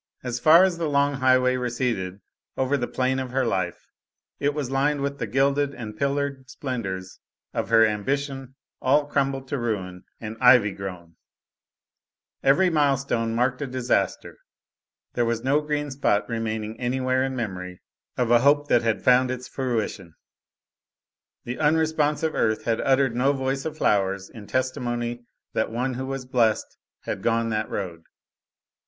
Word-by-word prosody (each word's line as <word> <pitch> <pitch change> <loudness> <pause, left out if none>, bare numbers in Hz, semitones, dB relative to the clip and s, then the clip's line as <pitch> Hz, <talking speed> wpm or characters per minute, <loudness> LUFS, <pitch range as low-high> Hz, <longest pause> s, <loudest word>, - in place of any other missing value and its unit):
As 125 -1 -3
far 160 +6 +7
as 180 -3 +1
the 165 -2 -1
long 140 0 +2
highway 130 -1 +3
receded 120 -6 -2 0.4
over 130 +2 +1
the 120 -3 -1
plain 130 +1 0
of 130 -1 -4
her 130 +1 0
life, 90 -2 -2 0.5
it 145 0 +1
was 140 -4 -3
lined 140 +2 +1
with 140 0 -3
the - - -2
gilded 140 +1 +1
and 110 -3 -7
pillared 140 0 -2
splendors 95 -10 -5 0.3
of - - -2
her 115 -1 +6
ambition 135 +5 -2 0.3
all 145 +3 +3
crumbled 135 -2 -1
to 140 - -2
ruin 95 -6 -3 0.2
and 110 0 -7
ivy 125 -5 +6
grown; 90 -4 -8 1.2
every 140 +8 +4
milestone 135 -7 +1
marked 125 +3 0
a 145 - -2
disaster; 125 -6 -1 0.7
there 120 - +1
was 115 -1 -1
no 140 +3 +2
green 150 -1 -2
spot 130 -6 +1
remaining 110 -1 -3
anywhere 130 +1 0
in 135 0 -2
memory 90 -6 -5 0.4
of 120 -2 +1
a 120 - +7
hope 145 +3 +3
that 120 - +4
had 115 -2 -1
found 125 0 +5
its 125 0 -4
fruition; 110 - -3 1.3
the 120 +1 -5
unresponsive 155 0 +1
earth 110 -1 0
had 115 -1 0
uttered 135 -2 +2
no 135 +3 +3
voice 135 0 -2
of 155 -1 -4
flowers 95 -4 +1
in 105 -3 -11
testimony 120 -2 -2 0.3
that 110 - 0
one 125 +3 -1
who 130 +2 -4
was 135 -1 -4
blest 115 -4 0 0.2
had - - -4
gone 115 0 +1
that 110 0 -2
road. 85 -4 -5
130 Hz, 155 wpm, -25 LUFS, 115-140 Hz, 1.3 s, far